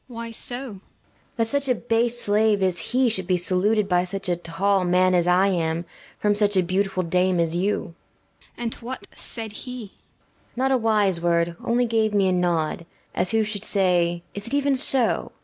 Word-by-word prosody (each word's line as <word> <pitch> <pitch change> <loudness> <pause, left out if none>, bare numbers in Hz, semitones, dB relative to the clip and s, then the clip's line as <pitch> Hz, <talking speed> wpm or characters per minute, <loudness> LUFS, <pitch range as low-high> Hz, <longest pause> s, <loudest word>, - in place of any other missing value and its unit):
BELLAMIRA. 230 -1 -7
Why 230 - -7
so? 245 +2 +1
PILIA 260 - -7
BORZA. 195 -2 -12 0.6
That 230 -1 +1
such 280 +2 0
a 250 - +3
base 235 +1 0
slave 210 -1 +2
as 185 -2 +1
he 255 +1 +1
should 190 -6 -1
be 185 - +2
saluted 195 +4 +1
by 180 -2 +2
such 195 +1 -4
a 175 - +2
tall 180 +3 0
man 180 +1 +3
as 175 -1 +2
I 185 +2 +4
am, 165 -2 -1 0.3
from 210 0 +1
such 205 -1 +1
a 185 - +4
beautiful 185 +1 -1
dame 180 +1 +1
as 165 0 0
you. 195 +4 +1
BELLAMIRA. - - -7 0.6
And 235 -1 -3
what 250 +3 -6
said 225 -2 -2
he? 250 +4 -7
PILIA - - -15
BORZA. - - -33 0.6
Not 265 +2 0
a 265 - +4
wise 205 -6 +2
word; 170 0 +1
only 240 +1 +1
gave 220 -2 0
me 195 -2 +3
a - - +2
nod, 170 -2 -1 0.3
as 180 - 0
who 225 -1 +2
should 210 -1 -5
say, 175 -4 +1
"Is 205 +1 -4
it 260 - -2
even 285 -1 +2
so?" 255 -2 +1
200 Hz, 210 wpm, -23 LUFS, 180-225 Hz, 0.6 s, I